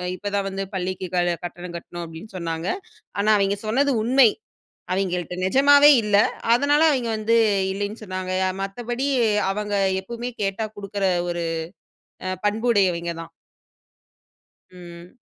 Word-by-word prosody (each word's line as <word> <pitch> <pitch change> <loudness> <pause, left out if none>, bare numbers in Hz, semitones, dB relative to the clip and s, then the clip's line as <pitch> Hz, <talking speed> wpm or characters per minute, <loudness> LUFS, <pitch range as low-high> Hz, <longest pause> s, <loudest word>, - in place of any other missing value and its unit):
இப்ப 205 +3 -5
தான் 200 -1 0
வந்து 195 0 -4
பள்ளிக்கு 185 0 -3
க - - +3 0.3
கட்டணம் 175 0 -7
கட்டுணோம் 170 0 -8
அப்படின்னு 165 +7 -11
சொன்னாங்க. 165 0 -4 0.5
ஆனா 205 +2 +2
அவங்க 200 +1 +1
சொன்னது 275 +5 +2
உண்மை. 250 +1 +5 0.6
அவங்கள்ட்ட 180 -2 -2
நெஜமாவே 285 +7 +6
இல்ல. 205 -1 +3 0.4
அதனால 285 +5 +3
அவங்க 250 -5 -1
வந்து 225 +2 +1 0.4
இல்லைன்னு 205 +3 -4
சொன்னாங்க. 185 -1 -4 0.3
மத்தபடி 240 +6 -3 0.4
அவங்க 205 +1 -3 0.3
எப்பவுமே 235 +4 -6
கேட்டா 200 +3 -1
குடுக்கற 200 0 -3 0.2
ஒரு 175 0 -2 0.8
அ 185 - -1
பண்புடையவிங்க 200 -6 +1
தான். 165 0 -11 1.4
ம். 175 +3 -12
200 Hz, 120 wpm, -23 LUFS, 180-230 Hz, 1.4 s, நெஜமாவே